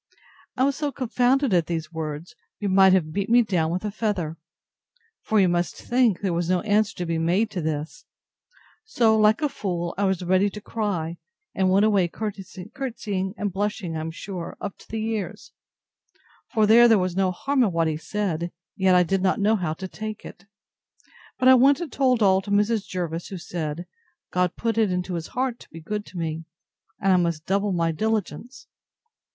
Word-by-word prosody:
I 255 - +3
was 275 0 +2
so 295 -2 -1
confounded 255 0 +1
at 170 -3 +2
these 165 -1 -4
words, 160 +3 -5 0.2
you 205 - -2
might 190 0 +6
have 165 -5 +2
beat 200 +3 -2
me 240 +1 +6
down 175 -7 0
with 185 +4 -3
a 210 - -2
feather. 200 -7 -2 0.9
For 220 - +1
you 190 - +5
must 175 0 0
think, 240 -6 +1
there 190 -4 0
was 170 0 -1
no 180 -1 +2
answer 210 0 +1
to 180 - -4
be 165 -1 -1
made 185 +7 +1
to 180 - -3
this: 155 +9 -4 0.8
So, 235 - +2
like 215 +5 +3
a - - +4
fool, 175 -9 -3
I 200 - +2
was 190 -2 0
ready 185 +3 +3
to 210 - -8
cry; 190 -7 -3 0.4
and 190 -1 +1
went 195 +3 +4
away 200 -5 +3
courtesying 205 +1 -5
and 205 -3 -2
blushing, 195 -4 -2
I - - -2
am 160 +1 -4
sure, 175 +1 -7
up 200 - -5
to - - -17
the 220 -1 -3
ears; 220 -3 -4 1.0
for, 215 -1 +3
though 235 +3 +7
there 225 -2 +5
was 185 -2 -1
no 190 -1 +2
harm 270 +9 0
in 220 -6 +3
what 165 -1 +1
he 155 - -1
said, 170 0 -3 0.2
yet 190 -1 +3
I 180 - +6
did 190 +2 0
not 190 +1 +1
know 210 +2 +3
how 175 -6 -2
to 190 +4 -7
take 215 +2 -7
it. 195 - -12 0.9
But 255 - +2
I 260 - +9
went 270 +2 +5
and 340 -4 -5
told 255 -4 +2
all 190 -1 +4
to 195 - -10
Mrs. 205 0 +1
Jervis, 170 -2 -4
who 195 - -6
said, 170 -1 -5 0.5
God 180 -1 0
put 230 -1 -1
it 215 -4 +2
into 180 0 -2
his 165 -2 -4
heart 250 -1 -2
to - - -16
be 165 - -10
good 210 +6 -5
to 185 - -10
me; 165 -1 -3 0.5
and 195 -3 +3
I - - +5
must 170 -3 -1
double 200 +1 0
my 165 -2 +1
diligence. 220 - -3
195 Hz, 200 wpm, -24 LUFS, 175-220 Hz, 1.0 s, I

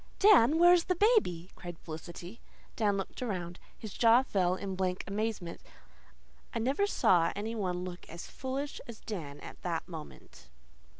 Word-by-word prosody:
"Dan, 320 - +6
where's 350 0 +6
the 365 - +1
baby?" 350 - +2
cried 175 -2 -8
Felicity. 170 +6 -9 0.3
Dan 205 -3 +1
looked 195 - -5
around. 180 -7 -4 0.2
His 215 -3 -8
jaw 235 +2 +5
fell 185 -7 +1
in 195 0 -4
blank 185 -1 -1
amazement. 200 -4 -3 0.9
I - - +1
never 270 - +1
saw 170 - +3
any 215 +3 -3
one 180 -5 -2
look 180 -1 -8
as 170 +1 -8
foolish 270 +2 -5
as 235 -2 -9
Dan 155 -9 -6
at - - -10
that 170 -2 -2
moment. 155 - -11
195 Hz, 155 wpm, -31 LUFS, 175-245 Hz, 0.9 s, Dan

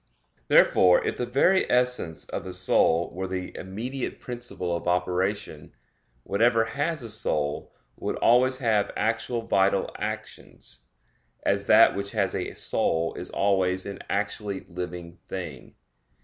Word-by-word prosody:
Therefore 90 -1 +5
if - - -2
the 125 - -2
very 160 +10 +3
essence 125 -10 0
of - - -4
the 95 0 -7
soul 85 -2 +2
were 95 +2 -4
the 90 0 -5
immediate 120 +8 -5
principle 120 -8 -4
of 85 - -5
operation, 90 -1 -1 0.5
whatever 115 - +3
has 145 +4 -2
a 115 - -5
soul 75 -8 -1 0.3
would - - -3
always 130 +2 +4
have 110 -6 +1
actual 115 +1 -1
vital 100 -2 +1
actions, - - -7 0.6
as - - 0
that - - +7
which 100 0 -4
has - - 0
a - - -3
soul 80 0 0
is - - -6
always 95 -2 +1
an 100 - -6
actually 100 0 -2
living 90 -1 -7
thing. 85 -8 -7
100 Hz, 135 wpm, -26 LUFS, 90-120 Hz, 0.6 s, that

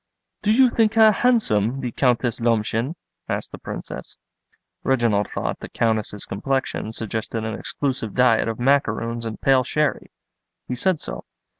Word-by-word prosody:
"Do 210 - +2
you 250 +2 +5
think 225 -1 +2
her 220 -1 +7
handsome, 135 - +2
the 125 -2 -3
Countess 125 -2 +1
Lomshen?" 115 +4 0 0.3
asked - - -3
the - - -9
Princess. - - -7 0.6
Reginald 115 -6 +1
thought - - -3
the - - -8
Countess's 110 -2 -1
complexion 130 +1 -2
suggested 110 0 -3
an 110 - -3
exclusive 130 -6 -3
diet 125 -3 +4
of 115 0 -3
macaroons 120 -3 +1
and 110 -1 -5
pale 135 -1 +4
sherry. 150 +4 -1 0.6
He - - -3
said 170 +6 +1
so. - - -4
120 Hz, 145 wpm, -23 LUFS, 110-140 Hz, 0.6 s, her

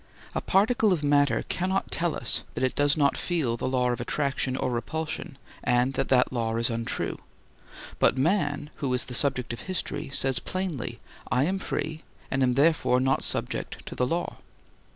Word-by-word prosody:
A - - -1
particle 215 +2 +3
of 165 -5 0
matter 145 -4 +3
cannot 190 +2 -1
tell 170 -1 +1
us - - +1
that - - -2
it 130 - +2
does 145 +1 +3
not 140 -2 +3
feel 155 -10 0
the 120 - -3
law 125 -1 +1
of 120 - -3
attraction 135 -2 -1
or 125 - -1
repulsion 155 +4 -3 0.3
and 125 +2 +2
that 135 0 -1
that 130 -1 +3
law 115 -2 -1
is 115 +1 +1
untrue, 115 0 -2 0.8
but 130 - +4
man, 145 -1 0
who 135 -3 -2
is 125 - 0
the 125 - -7
subject 125 -2 +2
of 120 - -6
history, 185 - -2
says 135 -2 +1
plainly: 165 -11 -4 0.3
I 125 +3 +3
am 190 +5 0
free 155 -4 -3 0.3
and 135 - 0
am 125 -1 +3
therefore 145 -3 +3
not 130 +1 +1
subject - - -1
to - - -7
the 125 - 0
law. 170 +5 -2
135 Hz, 180 wpm, -27 LUFS, 125-160 Hz, 0.8 s, but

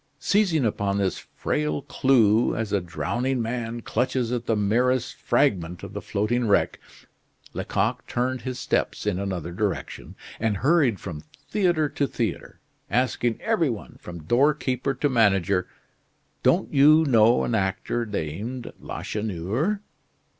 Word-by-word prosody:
Seizing 185 - +2
upon 100 -2 0
this 95 -2 0 0.2
frail 75 0 -1
clue, 115 -4 +3
as 110 -2 -3
a 100 - +2
drowning 120 +9 -2
man 115 0 -3
clutches 125 0 -1
at 120 -1 -3
the 115 - +2
merest 120 +5 +1
fragment 90 -1 0
of 100 0 -8
the 105 - -5
floating 115 +4 0
wreck, 100 - +2 0.7
Lecoq 115 +5 -1
turned 125 +1 -1
his 130 -1 -4
steps - - -1
in 90 - 0
another 95 -4 -3
direction, 100 +1 -3 0.2
and 110 -2 0
hurried 140 - +3
from 80 -6 -7 0.3
theatre 175 -7 +2
to 140 0 -1
theatre, - - -4 0.3
asking 120 -1 0
every 215 -10 +1
one, 110 -4 -7
from 85 -3 -9
doorkeeper 135 - +1
to 145 - +1
manager: 100 - +2 0.7
"Don't - - +2
you 155 +3 +6
know 115 -3 +4
an - - -1
actor 100 +3 -1
named 105 - -5
Lacheneur?" 110 - -2
115 Hz, 130 wpm, -25 LUFS, 100-130 Hz, 0.7 s, you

